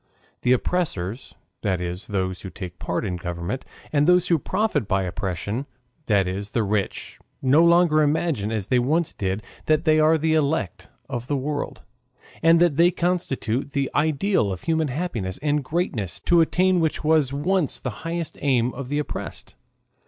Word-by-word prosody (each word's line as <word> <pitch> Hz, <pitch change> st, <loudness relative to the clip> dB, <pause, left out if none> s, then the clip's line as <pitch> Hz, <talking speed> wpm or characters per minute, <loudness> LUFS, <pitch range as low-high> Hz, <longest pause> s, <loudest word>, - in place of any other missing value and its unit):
The 125 Hz, -, +2 dB
oppressors, 125 Hz, -, -2 dB, 0.3 s
that 95 Hz, -4 st, 0 dB
is, 90 Hz, +2 st, -4 dB
those 95 Hz, -3 st, -2 dB
who 95 Hz, -, -7 dB
take 90 Hz, -2 st, -8 dB
part 90 Hz, -, -2 dB
in 90 Hz, -3 st, -2 dB
government, 85 Hz, +8 st, -4 dB, 0.3 s
and 145 Hz, +1 st, +3 dB
those 180 Hz, 0 st, +4 dB
who 170 Hz, -2 st, +4 dB
profit 185 Hz, -, 0 dB
by 95 Hz, -1 st, +1 dB
oppression, 100 Hz, +7 st, -3 dB, 0.4 s
that 100 Hz, -4 st, +3 dB
is, 100 Hz, +3 st, -4 dB
the 115 Hz, -, +2 dB
rich, 100 Hz, -1 st, -2 dB, 0.2 s
no 140 Hz, +5 st, +4 dB
longer 170 Hz, -2 st, +5 dB
imagine, 150 Hz, -8 st, +1 dB
as 110 Hz, -4 st, -2 dB
they 125 Hz, +4 st, +2 dB
once 155 Hz, +7 st, +1 dB
did, 95 Hz, +2 st, -2 dB, 0.2 s
that 155 Hz, +1 st, +2 dB
they 155 Hz, -1 st, +4 dB
are 155 Hz, +1 st, +5 dB
the 160 Hz, +1 st, +1 dB
elect 150 Hz, -, 0 dB, 0.2 s
of 120 Hz, -3 st, -5 dB
the 145 Hz, -, 0 dB
world, 145 Hz, +2 st, -4 dB, 0.6 s
and 165 Hz, +1 st, +6 dB
that 170 Hz, -5 st, +3 dB
they 170 Hz, +1 st, +6 dB
constitute 145 Hz, -8 st, -1 dB
the 140 Hz, -1 st, 0 dB
ideal 155 Hz, -, +1 dB
of 95 Hz, -, -5 dB
human 160 Hz, -1 st, +1 dB
happiness 125 Hz, -, -3 dB
and 150 Hz, -1 st, +1 dB
greatness, 130 Hz, -, -2 dB
to 175 Hz, -1 st, +4 dB
attain 185 Hz, +2 st, +3 dB
which 160 Hz, -2 st, 0 dB
was 155 Hz, -4 st, +3 dB
once 160 Hz, +3 st, 0 dB
the 130 Hz, -, -4 dB
highest 165 Hz, -1 st, -4 dB
aim 125 Hz, -3 st, +2 dB
of 130 Hz, 0 st, -6 dB
the 145 Hz, -, -1 dB
oppressed. 150 Hz, -, -5 dB
140 Hz, 170 wpm, -24 LUFS, 105-160 Hz, 0.6 s, and